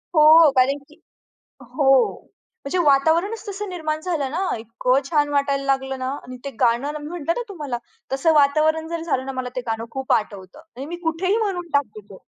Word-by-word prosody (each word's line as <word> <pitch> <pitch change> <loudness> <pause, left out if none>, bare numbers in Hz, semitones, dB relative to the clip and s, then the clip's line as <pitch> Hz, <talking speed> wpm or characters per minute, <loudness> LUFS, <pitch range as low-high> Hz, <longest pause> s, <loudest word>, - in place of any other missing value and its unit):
हो. 310 0 +7
कारण 265 +2 +4
की 305 +3 -20 0.6
हो. 270 -3 +3 0.5
म्हणजे 280 +6 -2
वातावरणच 325 +11 +2
तसं 405 0 -5
निर्माण 315 -4 -3
झालं 315 -6 -2
ना 325 +6 -2 0.2
इतकं 245 +4 0
छान 295 0 +1
वाटायला 280 -1 0
लागलं 265 -1 -1
ना 260 0 -3
आणि 255 0 -9
ते 280 - -4
गाणं 265 +6 +1
मी 295 - -8
म्हटलं 335 -1 -2
ना 485 - -1
तुम्हाला 295 -11 -5 0.3
तसं 270 +5 +2
वातावरण 310 +2 +3
जरी 335 -1 -4
झालं 265 -5 -1
ना 270 - -4
मला 255 -1 -4
ते - - 0
गाणं 225 0 -2
खूप 265 -1 -2
आठवतं 200 +2 -2 0.2
आणि 270 - -6
मी 345 +3 -5
कुठेही 355 +5 0
म्हणून 385 -6 -2
टाकते 235 -7 0
तो. 190 - -13
290 Hz, 185 wpm, -22 LUFS, 265-330 Hz, 0.6 s, हो